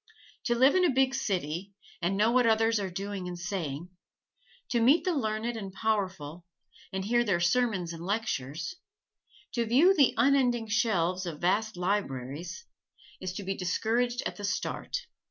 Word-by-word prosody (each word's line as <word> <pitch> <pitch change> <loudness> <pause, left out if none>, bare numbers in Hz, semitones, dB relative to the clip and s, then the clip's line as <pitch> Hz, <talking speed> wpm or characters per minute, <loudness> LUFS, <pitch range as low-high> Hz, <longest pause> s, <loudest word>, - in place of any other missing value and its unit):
To 240 - +2
live 260 +4 +5
in 370 - +3
a 355 - +5
big 265 0 +2
city 195 - -2 0.3
and 185 +3 0
know 215 +3 +4
what 250 -1 +4
others 225 0 +3
are 195 -2 -2
doing 195 0 -5
and 175 -1 -5
saying; 175 -3 -4 0.8
to 240 - +2
meet 275 +8 +5
the 365 - +2
learned 225 -3 -1
and 200 -4 -6
powerful, 190 -6 -2 0.5
and 190 0 -3
hear 240 +3 +3
their 200 -6 +1
sermons 180 -2 +1
and 165 0 -8
lectures; 195 - -3 0.8
to 235 - +1
view 270 - +5
the 285 -9 +4
unending 245 -2 +3
shelves 185 -5 +1
of 155 -3 -5
vast 210 +3 +1
libraries 175 - -3 0.5
is 185 - -4
to 200 - -5
be 195 +1 -1
discouraged 235 +7 0
at - - -3
the 205 - -8
start. 485 - -3
205 Hz, 160 wpm, -29 LUFS, 180-240 Hz, 0.8 s, live